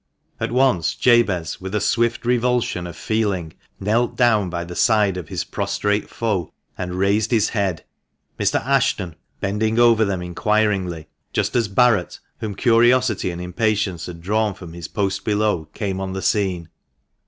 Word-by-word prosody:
At - - -2
once 125 - +2
Jabez, 100 -11 +2
with 95 +2 -5
a - - +2
swift 120 +2 0
revulsion 120 -7 0
of 85 - -9
feeling, 95 -2 -1 0.3
knelt 115 +5 0
down 110 -6 +3
by 85 0 -3
the 90 +1 -8
side 105 -3 +3
of 90 -4 -6
his - - -3
prostrate 105 0 -1
foe, 105 -7 -2 0.2
and 90 0 -4
raised 100 +3 +2
his 110 -3 +2
head, 100 -6 -1 0.6
Mr. - - +2
Ashton 130 - +1 0.3
bending 110 +3 0
over 115 -2 +5
them 95 -4 -1
inquiringly, 95 -3 0 0.3
just - - -1
as 115 -3 +2
Barret, 105 -2 +2 0.2
whom 110 -3 -4
curiosity 120 -2 +3
and 85 -1 -5
impatience 100 0 -1
had 85 -2 -9
drawn 105 +2 0
from 85 -3 -10
his 85 -1 -7
post 100 -2 -2
below, 105 -6 0
came 95 +3 -4
on 95 -1 -4
the 95 -1 -4
scene. 90 -5 0
105 Hz, 155 wpm, -21 LUFS, 90-115 Hz, 0.6 s, over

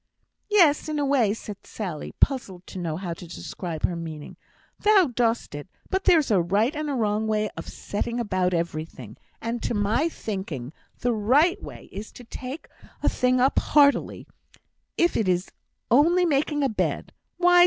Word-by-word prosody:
"Yes, 335 -8 +4
in 305 - -1
a 290 - +1
way," 265 -7 +3
said 210 -1 -6
Sally, 180 -8 -5
puzzled 195 -10 0
to 185 - -8
know 165 -3 -2
how 180 -2 -4
to 170 +1 -10
describe 165 -1 -6
her 175 - +1
meaning. 160 -3 -7 0.4
"Thou 400 -9 +4
dost 230 -5 0
it 145 +3 -7 0.2
but 380 0 0
there's 320 -9 +4
a 195 -4 +4
right 205 - +1
and 305 0 -2
a 280 - -1
wrong 215 -2 0
way 215 -1 0
of - - -8
setting 235 +4 -3
about 185 -5 0
everything 155 - -4 0.3
and 230 +1 -2
to - - -1
my 215 +10 +1
thinking, 180 - -5 0.3
the 245 -1 +2
right 275 - +3
way - - -10
is 205 +3 -7
to 245 - -11
take 255 +5 -7 0.4
a - - +4
thing 250 0 +2
up 260 +2 +3
heartily, 285 -1 +3 0.7
if 345 0 +3
it 215 - +1
is 180 +1 0 0.4
only 335 +8 +5
making 295 -1 +1
a - - +4
bed. 220 - -2 0.2
Why! 355 0 +5
225 Hz, 175 wpm, -25 LUFS, 185-285 Hz, 0.7 s, only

